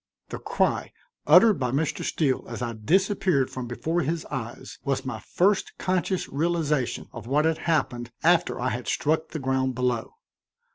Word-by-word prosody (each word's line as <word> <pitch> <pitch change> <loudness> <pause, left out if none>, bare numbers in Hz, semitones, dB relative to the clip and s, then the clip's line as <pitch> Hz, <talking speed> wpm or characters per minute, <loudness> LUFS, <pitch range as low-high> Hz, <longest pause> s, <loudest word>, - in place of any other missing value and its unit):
The - - -5
cry, - - 0 0.3
uttered 185 +7 +7
by 125 -2 0
Mr. 140 +5 -1
Steele 140 -5 0
as 120 +1 -4
I 120 -1 -2
disappeared 180 - +1
from 130 -2 -5
before 160 +8 -1
his 160 +2 -2
eyes, 120 -2 -6
was 135 -2 -1
my 130 - -4
first 195 +2 +1
conscious 185 0 -1
realization 150 -4 -1
of 115 -1 -8
what 150 +4 +2
had 160 0 +1
happened 120 -7 0
after 175 +1 +3
I 125 +1 0
had 125 0 -4
struck 155 +2 +1
the - - -6
ground 130 -2 0
below. 125 -2 -1
145 Hz, 160 wpm, -26 LUFS, 125-170 Hz, 0.3 s, uttered